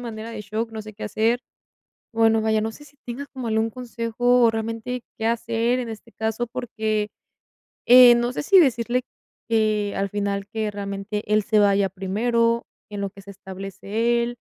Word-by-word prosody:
manera 230 -1 -6
de 220 - -6
shock, 215 +3 -3
no 220 - -5
sé 215 0 -10
qué 215 - -7
hacer. 225 +4 +1 0.7
Bueno, 225 0 +4
vaya, 220 0 +2
no 225 +1 -2
sé 295 +5 -14 0.2
tengas 260 +4 -6
como 255 -3 -6
algún 220 +1 +1
consejo, 245 0 +1
o - - +6
realmente 230 +2 -4
qué 220 - -3
hacer 230 +1 0
en 240 -2 -4
este 225 +1 -9
caso, 220 +2 -2
porque, 215 -3 -2 0.8
eh, 245 0 +9
no 240 +1 0
sé - - -2
si 385 +3 +6
decirle 245 -3 +2 0.5
que 215 -2 +1
al 195 0 -1
final 200 0 -2
que 215 0 -3
realmente 200 +1 -4
él 215 -1 +4
se 215 0 +2
vaya 200 -1 +3
primero, 230 +5 0 0.2
en 205 -1 -5
lo 200 - -2
que 200 - -13
se 200 +1 -11
establece 200 +5 -2
él, 240 0 -4
225 Hz, 180 wpm, -23 LUFS, 210-235 Hz, 0.8 s, eh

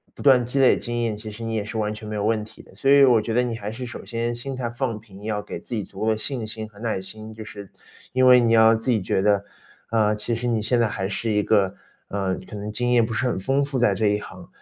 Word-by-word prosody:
不 - - -10
断 130 -3 +5
积 125 +4 -3
累 130 - +5
经 120 0 -3
验， 110 -3 -1
其 110 0 -7
实 115 +2 -8
你 115 - -3
也 105 - -1
是 110 +1 -5
完 105 -1 -1
全 105 0 -9
没 105 - -4
有 105 - -2
问 110 0 +1
题 110 - -15
的。 - - -19
所 135 - 0
以 140 0 +8
我 120 -4 +5
觉 115 +1 -3
得 125 - +3
你 120 -2 -2
还 105 -2 -5
是 125 +3 -6
首 120 - -8
先 115 0 -2
心 135 +3 -5
态 125 -2 -3
放 120 -1 -2
平， 100 -2 -15
要 105 -1 -2
给 - - -7
自 120 - -6
己 105 - -1
足 95 - -12
够 110 - +2
的 110 - 0
信 120 0 -3
心 110 0 -5
和 105 - -21
耐 110 -4 -1
心， 110 +3 -9
就 110 0 -8
是 100 -2 -10 0.4
因 130 0 +3
为 125 -1 +8
你 115 -1 +2
要 110 0 +7
自 115 +3 -3
己 110 -4 +2
觉 95 - 0
得， 100 0 +3 0.4
啊， 110 -2 +2
其 105 +2 -2
实 120 +2 -3
你 115 -3 +1
现 120 +3 +1
在 115 - +3
还 95 -2 -3
是 115 +1 -2
一 105 -1 +2
个， 100 -3 +2 0.3
呃， 95 -2 -1
可 - - -8
能 105 +1 -5
经 120 +3 -1
验 120 -2 +5
不 115 - -6
是 125 +3 0
很 120 - -1
丰 135 +8 +1
富 140 -1 -2
在 120 -5 +3
这 105 +2 +1
一 105 0 +1
行， - - -11
110 Hz, 320 characters per minute, -23 LUFS, 105-120 Hz, 0.4 s, 以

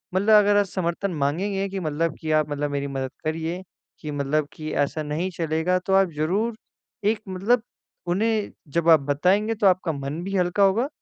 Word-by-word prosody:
मतलब 210 +3 +5
अगर 205 0 +4
आप 205 - +4
समर्थन 185 +1 -2
माँगेंगे 195 +7 -1
कि 195 - -4
मतलब 160 -1 -1
कि 155 -1 -2
आप 155 -1 +2
मतलब 145 0 -2
मेरी 140 0 -2
मदद 135 -1 -4
करिए, 165 +3 -2 0.4
कि 150 - -6
मतलब 145 +1 0
कि 155 0 -6
ऐसा 155 +2 -5
नहीं 155 +5 -2
चलेगा 160 +2 +1
तो 190 - 0
आप 195 -3 +4
ज़रूर 200 +9 0 0.5
एक 220 -2 0
मतलब 205 +6 +1 0.5
उन्हें 215 +4 0 0.3
जब 170 0 +3
आप 160 -2 +8
बताएँगे 200 +9 +2
तो 210 -2 +3
आपका 185 -2 +2
मन 140 +3 -4
भी 195 +1 -3
हल्का 180 +3 +2
होगा 215 +7 +3
175 Hz, 185 wpm, -24 LUFS, 155-200 Hz, 0.5 s, आप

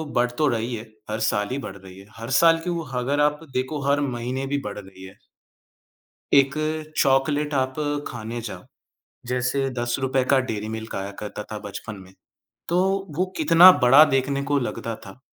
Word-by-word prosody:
बढ़ 120 0 +2
तो 155 - +3
रही 120 -1 -1
है, 110 - -6 0.3
हर 110 +1 -2
साल 105 -2 0
ही 135 - -2
बढ़ 95 - -7
रही 95 -1 -13
है, 100 - -13
हर 115 +1 -7
साल 165 -1 +6
क्यों, 170 -1 -3
अगर 130 +3 -1
आप 150 0 +2
देखो, 130 +3 -2
हर 140 +1 +3
महीने 130 0 -3
भी 140 +1 -1
बढ़ 105 0 -5
रही 95 -1 -13
है। 95 - -11 1.2
1 140 0 +5 0.4
चॉकलेट 145 +2 +2
आप 130 -1 0 0.3
खाने 120 0 -6
जाओ, 115 - -8 0.6
जैसे 125 +2 0
₹10 130 +2 0
का 135 - +5
डेयरी 110 -5 -3
मिल्क 110 0 -7
आया 95 +1 -4
करता 105 0 -6
था 105 - -4
बचपन 105 +1 -7
में, 95 +1 -18 0.6
तो 175 - +1 0.4
वो 185 - +2
कितना 165 +4 +8
बड़ा 135 +5 +8
देखने 140 +1 0
को 145 - +3
लगता 115 -2 -4
था। 95 +6 -12
130 Hz, 175 wpm, -23 LUFS, 110-140 Hz, 1.2 s, कितना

